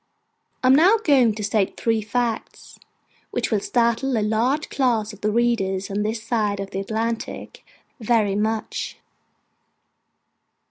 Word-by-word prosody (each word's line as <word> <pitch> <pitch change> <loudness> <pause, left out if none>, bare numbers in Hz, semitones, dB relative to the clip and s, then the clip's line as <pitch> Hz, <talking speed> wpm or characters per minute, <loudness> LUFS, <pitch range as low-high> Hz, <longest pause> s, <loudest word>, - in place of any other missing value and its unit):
I - - +3
am - - +7
now 360 +10 +6
going 265 - +3
to 215 - -5
state 205 -1 0
three 225 -1 +1
facts, 230 +1 -3 0.5
which - - -2
will 215 - +2
startle 235 +3 +1
a 215 - +1
large 240 +8 0
class 230 -6 0
of 210 - -15
readers 210 -4 0
on 200 +1 -1
this 215 +1 -2
side 215 -4 -1
of 195 0 -5
the 195 - -3
Atlantic, 225 +3 -4 0.4
very 220 -3 +1
much. 215 +1 -2
220 Hz, 135 wpm, -23 LUFS, 210-240 Hz, 0.5 s, am